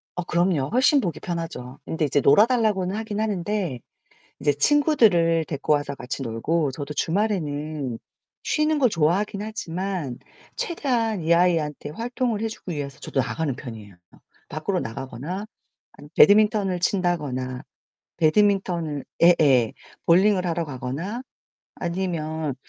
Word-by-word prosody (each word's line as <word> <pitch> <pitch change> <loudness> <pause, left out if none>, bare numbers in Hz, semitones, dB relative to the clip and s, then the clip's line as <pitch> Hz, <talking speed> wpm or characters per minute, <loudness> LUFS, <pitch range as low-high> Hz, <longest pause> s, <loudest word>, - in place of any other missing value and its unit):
어 180 - -2
그럼요. 170 -6 +1
훨씬 275 +4 +4
보기 175 - -3
편하죠. 165 -7 -5
근데 160 -1 -1
이제 145 0 +1
놀아달라고는 205 - +3
하긴 215 -1 -4
하는데 200 - -1 0.6
이제 145 - +3
친구들을 175 - +3
데리고 145 0 -1
와서 145 -1 0
같이 125 +2 -5
놀고 135 +6 -1
저도 145 +2 -6
주말에는 155 - -1 0.5
쉬는 305 0 +1
걸 255 - +4
좋아하긴 195 +5 +1
하지만 185 - -4 0.4
최대한 240 - -1
이 170 - +4
아이한테 165 -4 +1
활동을 235 - -2
해 225 - 0
주기 185 -6 -7
위해서 140 -2 -6
저도 - - -4
나가는 135 +3 -2
편이에요. 110 -6 -10 0.5
밖으로 155 +6 -2
나가거나 135 - -5 0.5
아니면 145 - -14
배드민턴을 205 -3 +5
친다거나, 145 -10 -1 0.6
배드민턴을 170 -4 +1 0.2
예 175 +1 +9
예 130 -6 +4 0.3
볼링을 185 +2 +4
하러 170 -1 -1
가거나 145 - -5 0.5
아니면 160 -5 -3
170 Hz, 315 characters per minute, -24 LUFS, 145-205 Hz, 0.6 s, 예